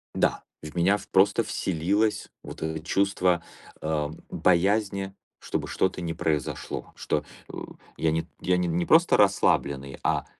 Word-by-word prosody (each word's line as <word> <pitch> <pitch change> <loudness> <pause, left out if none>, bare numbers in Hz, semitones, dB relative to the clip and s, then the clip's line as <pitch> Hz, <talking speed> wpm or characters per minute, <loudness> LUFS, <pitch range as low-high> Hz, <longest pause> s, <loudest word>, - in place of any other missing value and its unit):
Да, - - +1 0.2
в 75 +3 -9
меня 95 +4 +3
в - - -12
просто 100 +4 +4
вселилось 100 +6 0
вот - - -9
это 80 0 -2
чувство, 90 -1 +1 0.4
э, 75 -2 -1 0.2
боязни, 95 +2 +1 0.3
чтобы - - -3
что-то 95 -1 0
не 85 -1 -2
произошло, 75 -4 -2
что, 75 - -1 0.3
э, - - -10 0.4
я 80 -1 +1
не 80 +1 -1
я 90 0 +2
не 90 -1 0
не 85 +1 0
просто 165 +2 +5
расслабленный, 70 -9 +2
а, - - +1
90 Hz, 145 wpm, -26 LUFS, 80-100 Hz, 0.4 s, просто